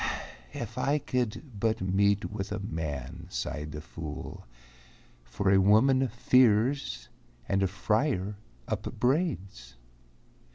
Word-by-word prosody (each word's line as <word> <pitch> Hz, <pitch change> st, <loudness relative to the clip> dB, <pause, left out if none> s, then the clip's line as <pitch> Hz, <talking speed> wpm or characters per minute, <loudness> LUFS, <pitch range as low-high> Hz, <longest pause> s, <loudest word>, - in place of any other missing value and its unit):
"If -, -, -5 dB
I 145 Hz, +2 st, +2 dB
could 130 Hz, -1 st, -2 dB
but 110 Hz, +1 st, +1 dB
meet 100 Hz, +2 st, +2 dB
with 100 Hz, -1 st, -4 dB
a -, -, -1 dB
man," 80 Hz, -9 st, -5 dB
sighed 75 Hz, +1 st, -4 dB
the 75 Hz, 0 st, -6 dB
fool, 75 Hz, -5 st, -7 dB, 0.8 s
"For 95 Hz, +11 st, 0 dB
a 95 Hz, -, +6 dB
woman 130 Hz, +7 st, +5 dB
fears, 125 Hz, +2 st, +3 dB, 0.4 s
and 95 Hz, 0 st, +1 dB
a 95 Hz, -, +3 dB
friar 105 Hz, +1 st, 0 dB, 0.3 s
upbraids." 120 Hz, -, -1 dB
100 Hz, 110 wpm, -29 LUFS, 95-125 Hz, 0.8 s, a